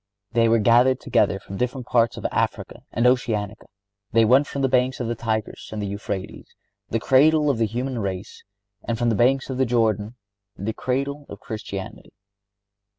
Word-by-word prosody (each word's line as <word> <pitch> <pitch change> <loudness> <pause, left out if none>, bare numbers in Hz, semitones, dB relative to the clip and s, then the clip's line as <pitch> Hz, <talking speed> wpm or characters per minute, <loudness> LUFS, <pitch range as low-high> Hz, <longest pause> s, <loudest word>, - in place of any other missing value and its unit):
They 115 -1 +3
were 115 - +4
gathered 120 +4 +4
together - - +1
from 95 - -9
different 125 +1 -2
parts 115 -2 +2
of - - -7
Africa - - -2
and 120 - 0
Oceanica. 110 -4 0 0.5
They 115 0 +5
went 130 +6 +4
from 140 - -3
the - - +4
banks 130 0 +1
of 120 - -2
the 120 - -1
Tigris 110 -2 -3
and 105 -1 -4
Euphrates, 100 -1 -6 0.3
the 115 - 0
cradle 150 +5 +4
of 120 - -3
the 115 - +2
human 125 +3 -3
race, 95 -2 -5 0.4
and 115 - -2
from 120 0 +1
the 115 - +1
banks 135 +5 +2
of 130 - -4
the 130 - +3
Jordan, 110 -2 0 0.4
the 105 +4 -3
cradle 140 +4 -3
of 100 - -9
Christianity. 105 -4 -7
120 Hz, 175 wpm, -23 LUFS, 110-130 Hz, 0.5 s, They